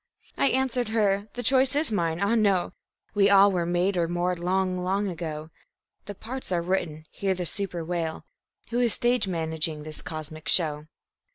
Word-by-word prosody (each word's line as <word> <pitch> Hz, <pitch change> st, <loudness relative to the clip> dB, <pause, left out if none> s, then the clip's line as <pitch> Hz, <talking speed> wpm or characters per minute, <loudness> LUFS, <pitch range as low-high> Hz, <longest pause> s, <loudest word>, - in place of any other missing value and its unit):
I -, -, +2 dB
answered 255 Hz, -2 st, 0 dB
Her: 205 Hz, -2 st, +1 dB
The 245 Hz, -, -5 dB
choice 265 Hz, +2 st, +3 dB
is 295 Hz, -3 st, +2 dB
mine 170 Hz, -5 st, 0 dB
ah, 200 Hz, +3 st, +2 dB
no! 200 Hz, -5 st, +2 dB, 0.4 s
We 200 Hz, -1 st, +4 dB
all 200 Hz, 0 st, +7 dB
were 175 Hz, -3 st, -1 dB
made 175 Hz, +3 st, +1 dB
or 170 Hz, -1 st, +2 dB
marred 175 Hz, +1 st, -1 dB
long, 185 Hz, +1 st, 0 dB
long 195 Hz, +3 st, 0 dB
ago. 160 Hz, -3 st, -5 dB, 0.6 s
The 205 Hz, -, -6 dB
parts 250 Hz, +3 st, -6 dB
are 170 Hz, -2 st, +1 dB
written; 160 Hz, -4 st, -2 dB
hear 195 Hz, -1 st, -1 dB
the 180 Hz, -1 st, -4 dB
super 175 Hz, -3 st, -3 dB
wail: 165 Hz, -2 st, -3 dB, 0.5 s
"Who 240 Hz, -, 0 dB
is 240 Hz, -3 st, +2 dB
stage 245 Hz, -3 st, +2 dB
managing 160 Hz, -3 st, -2 dB
this 155 Hz, 0 st, -6 dB
cosmic 155 Hz, 0 st, -6 dB
show?" 155 Hz, -3 st, +1 dB
185 Hz, 175 wpm, -26 LUFS, 165-210 Hz, 0.6 s, all